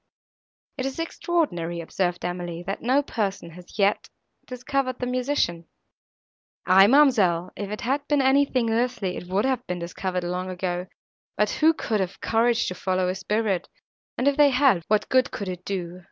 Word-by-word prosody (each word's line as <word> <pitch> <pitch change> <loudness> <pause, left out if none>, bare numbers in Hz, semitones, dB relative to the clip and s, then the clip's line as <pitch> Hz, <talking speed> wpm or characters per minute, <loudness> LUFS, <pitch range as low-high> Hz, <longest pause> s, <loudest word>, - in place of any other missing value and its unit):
"It 260 - -1
is 270 - -6
extraordinary," 300 - -1
observed 175 +1 -2
Emily, 175 -1 -4
"that 195 +2 -4
no 265 +4 +2
person 200 -9 -3
has 180 +4 -13
yet 200 0 +1 0.4
discovered 255 +1 -2
the 250 - -3
musician." 250 - -1 1.0
"Aye, 190 +2 +7
ma'amselle, 210 - +4
if 205 -1 -5
it 210 +3 -5
had 275 +4 -1
been 295 -1 +2
anything 265 -3 +2
earthly 230 -5 -1
it 180 - -7
would 195 +5 0
have 260 -2 -1
been 180 - -3
discovered 180 +1 -3
long 180 +1 -3
ago, 180 0 -3 0.5
but 210 0 +2
who 315 +1 +3
could 220 -7 -1
have 185 -2 -3
courage 230 +1 +1
to - - -4
follow 185 0 -1
a - - 0
spirit, 195 0 -1 0.5
and 255 - 0
if 285 - +3
they 295 -1 +6
had, 260 -8 +3
what 215 0 +1
good 255 -1 +3
could 200 - -5
it 180 -1 -5
do? 180 -2 -4
205 Hz, 170 wpm, -25 LUFS, 180-255 Hz, 1.0 s, Aye